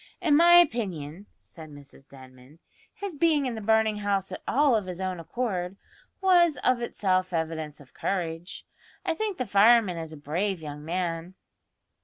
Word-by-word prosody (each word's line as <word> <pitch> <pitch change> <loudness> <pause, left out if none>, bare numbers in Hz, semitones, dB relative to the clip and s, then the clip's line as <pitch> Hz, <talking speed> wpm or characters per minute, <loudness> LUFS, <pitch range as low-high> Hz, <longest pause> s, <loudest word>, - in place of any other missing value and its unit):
"In 325 -6 +3
my 340 +3 +6
opinion," 205 - +2 0.2
said 160 -3 -12
Mrs 145 -1 -15
Denman, 130 +2 -16 0.3
"his 400 -5 -6
being 305 -2 +2
in 250 - -2
the 220 - -6
burning 220 0 +2
house 200 -2 -1
at - - -6
all 280 -2 +3
of 210 -4 -1
his 180 -1 -6
own 185 -2 -3
accord, 180 0 -3 0.4
was 350 -5 +4
of 255 -1 +2
itself 185 -5 0
evidence 160 -2 -3
of 140 -3 -17
courage. 175 -2 -4 0.4
I - - +1
think 415 +2 -3
the 255 - -2
fireman 205 -2 +4
is 160 -1 -6
a 155 - -9
brave 175 +7 -2
young 150 -1 -8
man." 170 +1 -3
190 Hz, 165 wpm, -26 LUFS, 160-240 Hz, 0.4 s, my